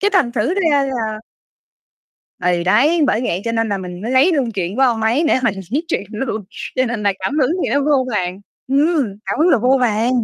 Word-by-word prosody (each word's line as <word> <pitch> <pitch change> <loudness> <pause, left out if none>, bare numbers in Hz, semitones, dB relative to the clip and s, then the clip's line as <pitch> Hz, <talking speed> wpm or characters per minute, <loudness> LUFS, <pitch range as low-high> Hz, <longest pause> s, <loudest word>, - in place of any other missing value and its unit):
cái 405 - +2
thành 275 -11 +3
thử 245 +8 0
ra 320 -8 +2
là 225 -5 -3 1.2
Thì 175 -1 0
đấy, 270 - +3
bởi 220 - +1
vậy 180 -5 -1
cho 230 - -1
nên 225 -1 0
là 200 -2 -1
mình 180 -1 -7
mới 230 - -3
lấy 265 +8 +4
luôn 270 -7 0
chuyện 190 0 -3
của 270 - +2
ông 235 -4 +2
ấy 235 +9 +2
để - - +3
mình 225 -4 +1 0.2
viết 295 +7 -1
chuyện - - -1
luôn 220 -2 -4 0.3
cho 255 - +3
nên 230 -2 -3
là 200 -1 +2
cảm 195 +11 -2
hứng 265 -2 +2
thì - - -1
nó 285 - +2
vô 280 -2 +2
vàn, 185 -1 -2 0.3
ừm, 285 0 +2 0.2
cảm - - -3
hứng 320 +4 +4
là 275 - +4
vô 255 +4 +3
vàn. 230 0 +1
240 Hz, 235 wpm, -18 LUFS, 210-280 Hz, 1.2 s, lấy